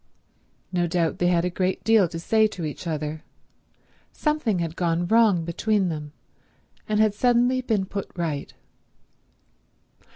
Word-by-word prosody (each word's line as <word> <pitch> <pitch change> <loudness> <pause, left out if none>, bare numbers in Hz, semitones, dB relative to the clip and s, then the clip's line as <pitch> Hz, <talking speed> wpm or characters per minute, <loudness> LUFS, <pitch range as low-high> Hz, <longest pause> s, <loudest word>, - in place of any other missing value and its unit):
No 175 -2 0
doubt 170 -1 0
they 175 - +2
had 175 -1 +2
a 180 - -1
great 185 +1 -1
deal 220 -4 +4
to 165 - -7
say 220 +6 +3
to 180 -6 -6
each 155 +4 -6
other; 155 -1 -4 0.9
something 300 - 0
had 165 -1 -3
gone 170 -1 0
wrong 210 -4 +3
between 195 +3 0
them, 150 -2 -5 0.8
and 210 0 +1
had 215 -1 +4
suddenly 245 +3 +2
been 220 -6 0
put 200 +1 -6
right. 160 -5 -3
180 Hz, 140 wpm, -24 LUFS, 165-220 Hz, 0.9 s, deal